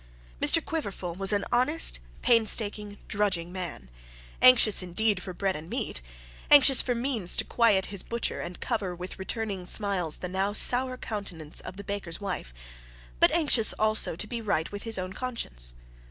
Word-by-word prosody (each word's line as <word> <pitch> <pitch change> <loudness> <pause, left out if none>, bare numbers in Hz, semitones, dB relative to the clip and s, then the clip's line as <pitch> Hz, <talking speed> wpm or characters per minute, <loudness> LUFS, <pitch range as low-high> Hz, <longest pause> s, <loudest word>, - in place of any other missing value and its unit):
Mr 330 - +4
Quiverful 200 - -5
was 195 +3 +2
an 205 -1 0
honest, 255 +7 +2 0.2
pain 230 -3 +3
staking, 210 -1 +2
drudging 185 -5 -2
man; 180 - -7 0.5
anxious, 250 -6 +6
indeed, 190 +2 -1
for 185 - -7
bread 190 +1 -3
and 155 +2 -9
meat, - - -4 0.5
anxious 275 -2 +8
for 245 - -2
means 235 -7 -1
to - - +2
quiet 215 -5 +2
his 195 - +1
butcher 235 0 -4
and 175 - -8
cover 200 -7 -3
with 180 +2 -9
returning 200 -1 -4
smiles 180 -4 +3
the 180 - -6
now 190 +3 -2
sour 255 +3 +2
countenance 180 -10 -5
of 185 - -9
the 200 - -8
baker's 195 -4 -5
wife, 195 - -6 0.7
but - - +4
anxious 280 -9 +4
also 215 -5 +1
to 180 - -4
be 230 +2 -6
right 200 -7 -2
with 205 0 -7
his 225 -2 +2
own 185 0 -5
conscience. - - -5
205 Hz, 170 wpm, -26 LUFS, 180-230 Hz, 0.7 s, anxious